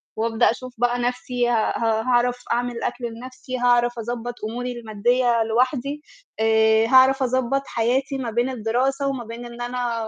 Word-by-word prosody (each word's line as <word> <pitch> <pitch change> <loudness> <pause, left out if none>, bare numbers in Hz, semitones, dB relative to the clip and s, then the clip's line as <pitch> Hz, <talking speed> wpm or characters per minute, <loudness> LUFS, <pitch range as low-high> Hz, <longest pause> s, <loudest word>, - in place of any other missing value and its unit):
وأبدأ 225 0 +2
أشوف 255 +1 -8
بقى 245 +1 +1
نفسي 245 0 -1
ها 225 -3 +1
ها 225 -1 +1
هاعرف 245 +1 +1
أعمِل 240 0 -1
أكل 245 0 -3
لنَفْسي، 255 +2 -7
هاعرف 240 -1 +3
أضبّط 240 +1 -4 0.2
أموري 245 +2 -4
المادية 235 +2 +1
لوحدي، 255 +5 0 0.4
آآ، 220 0 +4
هاعرف 265 +2 +5
أضبّط 260 +1 0
حياتي 260 +4 0
ما 245 -4 -4
بين 240 +3 0
الدراسة 260 +4 -1
وما 265 -3 -2
بين 230 +2 -8
إن 240 0 -9
أنا 240 -2 -2
245 Hz, 155 wpm, -23 LUFS, 230-255 Hz, 0.4 s, هاعرف